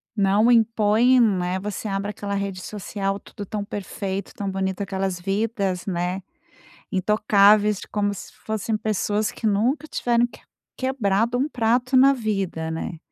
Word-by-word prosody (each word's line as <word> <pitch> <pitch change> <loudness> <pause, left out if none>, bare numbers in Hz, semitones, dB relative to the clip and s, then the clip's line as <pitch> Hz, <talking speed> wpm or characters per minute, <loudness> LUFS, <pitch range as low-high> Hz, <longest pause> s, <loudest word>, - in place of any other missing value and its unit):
Não 205 +4 +4
impõem, 230 +2 +4
né, 185 -4 +2
você 210 +2 -5
abre 195 +1 -2
aquela 205 -1 -5
rede 195 -2 -3
social, 200 -1 -3
tudo 205 - -9
tão 205 +1 -4
perfeito, 200 -1 -5
tão 200 -1 -4
bonito 190 0 -2
aquelas 190 -2 -2
vidas, 195 -1 -1
né, 180 0 -2 0.7
intocáveis, 210 +1 +4
de - - -10
como 205 -1 -1
se - - -10
fossem 220 0 -1
pessoas 210 0 -1
que 225 - -5
nunca 245 +9 +1
tiveram 240 0 +1
que - - -16 0.4
quebrado 235 -3 0
um 280 +4 +1
prato 245 +1 +1
na 270 +2 +7
vida, 195 -9 -2
né. 160 0 -4
205 Hz, 145 wpm, -23 LUFS, 195-225 Hz, 0.7 s, na